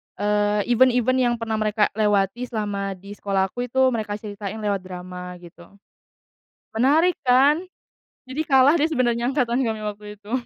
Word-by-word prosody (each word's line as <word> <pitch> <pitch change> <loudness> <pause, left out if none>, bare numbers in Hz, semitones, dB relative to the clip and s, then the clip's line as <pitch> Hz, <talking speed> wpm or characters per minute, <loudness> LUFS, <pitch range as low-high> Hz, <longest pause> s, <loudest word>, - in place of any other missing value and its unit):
eee, 205 0 +1
event-event 255 +1 +3
yang 240 -2 +2
pernah 225 -1 -3
mereka 215 0 +1
lewati 210 +3 0
selama 200 -3 -3
di 195 +2 -13
sekolahku 200 +5 -1
itu 260 +1 +2
mereka 215 -3 -3
ceritain 210 0 -7
lewat 200 -1 0
drama, 180 0 -8
gitu. 175 +2 -15 1.0
Menarik 300 +10 +3
kan? 275 +4 +4 0.6
Jadi 280 +5 -5
kalah 275 +3 +5
deh 305 - +3
sebenarnya 245 -5 0
angkatan 255 -3 0
kami 220 -1 -3
waktu 210 0 -6
itu. 210 +1 -14
220 Hz, 145 wpm, -23 LUFS, 205-255 Hz, 1.0 s, kalah